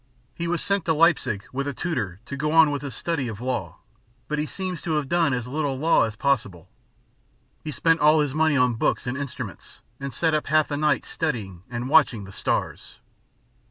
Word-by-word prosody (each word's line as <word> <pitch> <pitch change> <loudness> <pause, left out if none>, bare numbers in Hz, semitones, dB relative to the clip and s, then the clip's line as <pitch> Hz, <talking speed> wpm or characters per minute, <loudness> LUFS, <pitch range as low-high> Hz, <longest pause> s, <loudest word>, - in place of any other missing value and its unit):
He 170 - -4
was 170 0 -1
sent 200 -3 0
to 160 - +2
Leipzig 150 - +2
with 140 +2 -2
a 140 - -3
tutor 110 - -3
to 140 - -6
go 150 +2 -1
on 160 -2 +6
with 145 -2 -2
his 140 -5 -6
study 155 -4 -2
of 110 -3 -6
law, 125 0 -3 0.5
but 150 0 -2
he 150 - -1
seems 185 -1 -5
to 160 - -2
have 150 -2 0
done 165 -1 +2
as 125 -2 -2
little 140 0 -2
law 155 -3 +4
as 110 -2 -5
possible: 110 - -1 0.9
he 155 - -5
spent 165 +2 +2
all 150 +1 +5
his 145 -3 -1
money 155 -1 +2
on 125 -2 +3
books 115 - 0
and 125 0 -2
instruments, 140 -1 -7 0.2
and 140 0 -4
sat 160 +6 0
up 155 - 0
half 155 0 +3
the 145 - -2
night 150 -3 +1
studying 110 - -3
and 120 0 -4
watching 135 -7 +4
the 100 - -10
stars. - - -3
145 Hz, 205 wpm, -24 LUFS, 125-160 Hz, 0.9 s, on